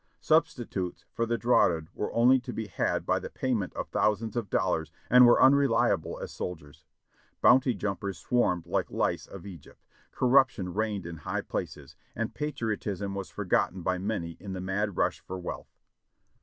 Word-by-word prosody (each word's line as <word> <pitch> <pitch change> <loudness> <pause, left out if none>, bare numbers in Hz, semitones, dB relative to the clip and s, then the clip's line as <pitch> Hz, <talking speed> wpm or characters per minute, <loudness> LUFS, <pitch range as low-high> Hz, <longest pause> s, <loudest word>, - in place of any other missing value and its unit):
Substitutes 90 -2 0
for 115 - -1
the 115 0 0
draughted 85 -10 +2
were - - -3
only 125 +3 +5
to 125 0 -7
be 110 -2 -4
had 95 - -1
by - - +1
the - - -7
pay 130 -1 -2
ment 100 -6 -1
of - - -4
thousands 105 +1 0
of 115 -5 -2
dollars, 80 -5 0 0.2
and 125 0 +9
were 120 - +6
unreliable 140 +1 +3
as - - -7
soldiers. 75 -5 -7 0.5
Bounty 125 -1 +5
jumpers 100 -1 -3
swarmed 90 -9 +1
like 85 - -1
the - - -11
lice - - 0
of 100 -1 -10
Egypt. 95 -4 -12 0.3
Corruption 125 -8 +2
reigned 105 -3 -2
in 85 -1 -6
high 75 - -3
places, - - -6 0.2
and 115 0 -3
patriotism 110 -9 -3
was 100 -1 -5
forgotten 90 -1 0
by 90 0 0
many 95 -4 -3
in 95 0 -7
the 95 - -4
mad 95 +1 -2
rush - - +1
for 95 - -7
wealth. 90 - -6
100 Hz, 170 wpm, -28 LUFS, 90-120 Hz, 0.5 s, and